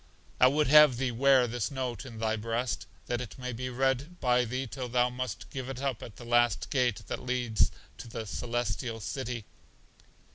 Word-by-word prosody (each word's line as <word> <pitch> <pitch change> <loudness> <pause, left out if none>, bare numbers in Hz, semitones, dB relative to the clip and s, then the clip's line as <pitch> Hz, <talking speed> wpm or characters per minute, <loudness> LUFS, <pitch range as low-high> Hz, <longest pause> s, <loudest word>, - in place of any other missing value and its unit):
I 125 - +8
would 150 +3 +3
have 150 -2 +7
thee 130 -1 0
wear 130 +1 +5
this 120 -2 -2
note 130 -1 -4
in 115 -3 -9
thy 110 0 0
breast, 115 +3 -2 0.2
that 120 0 -2
it 125 - -8
may 125 -1 -4
be 125 +2 -4
read 135 +7 -1
by 125 -1 +3
thee 130 +3 -2
till 125 0 -5
thou 125 +1 +2
must 130 0 -5
give 130 -1 -5
it 135 -1 -5
up 135 -4 -2
at 105 - -9
the 120 - -11
last 120 0 +2
gate 125 -5 +1
that - - -4
leads 125 -3 +1 0.3
to - - -8
The 115 -1 -5
Celestial 120 +1 -2
City. 120 +1 -4
125 Hz, 190 wpm, -30 LUFS, 120-130 Hz, 0.3 s, I